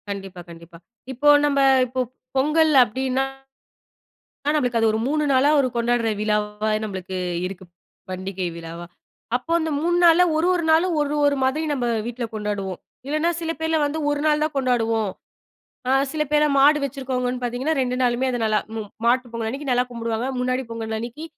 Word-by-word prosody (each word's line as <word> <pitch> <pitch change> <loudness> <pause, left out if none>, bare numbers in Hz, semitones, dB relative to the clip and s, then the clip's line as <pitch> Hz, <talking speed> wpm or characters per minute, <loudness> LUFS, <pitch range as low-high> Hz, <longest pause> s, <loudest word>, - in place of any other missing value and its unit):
கண்டிப்பா, 195 -2 -6
கண்டிப்பா. 170 0 -13 0.4
இப்போ 290 +4 +2 0.2
நம்ப 280 -1 +1 0.3
இப்ப 255 +1 -2 0.3
பொங்கல் 305 +3 +3
அப்டின்னா, 260 +3 -1 1.2
ஆனா 295 - +3
நம்ளுக்கு 250 -5 +1
அது 225 - +3
ஒரு 220 - 0
3 300 +1 0
நாளா 265 +2 +4
ஒரு 260 - +1
கொண்டாட்ற 235 0 +1
விழாவா 210 0 -1
நம்மளுக்கு 190 -2 -5 0.3
இருக்கு. 190 0 -8 0.5
பண்டிகை 185 0 -4
விழாவா. 170 +1 -8 0.5
அப்போ 255 +7 -5
அந்த 320 0 -2
3 345 +3 +1
நாளா 340 +1 +7
1, 320 +2 +2
1 345 -2 -1
நாளு 320 +3 +4
ஒரு, 295 0 0
ஒரு 285 0 +2
மாதிரி 280 +5 0
நம்ப 255 -4 -1 0.2
வீட்ல 240 0 -4
கொண்டாடுவோம். 205 -3 -3 0.3
இல்லன்னா 310 +4 +1
சில 330 -1 -3
பேர்லாம் 320 -1 +1
வந்து 295 +2 -3
1 290 0 -1
நாள் 300 0 +2
தான் 310 - -3
கொண்டாடுவோம். 230 -5 +1 0.8
அ - - +2 0.2
சில 310 -1 0
பேர்லாம் 300 -1 +3
மாடு 290 +2 +6
வச்சிருக்கவங்கன்னு 255 -2 -3
பாத்தீங்கன்னா 250 +6 -1
2 250 -1 -1
நாளுமே 250 +1 +1
அது 245 - -2
நல்லா 215 -1 +2 0.2
ம் 215 -2 -5 0.2
மாட்டு 245 0 +2
பொங்கல்லன்னைக்கி 230 +5 -4
நல்லா 250 0 +3
கும்புடுவாங்க. 230 0 -3
முன்னாடி 255 +1 0
பொங்கல் 225 -1 -4
அன்னிக்கு 240 +7 -7
250 Hz, 165 wpm, -22 LUFS, 220-295 Hz, 1.2 s, நாளா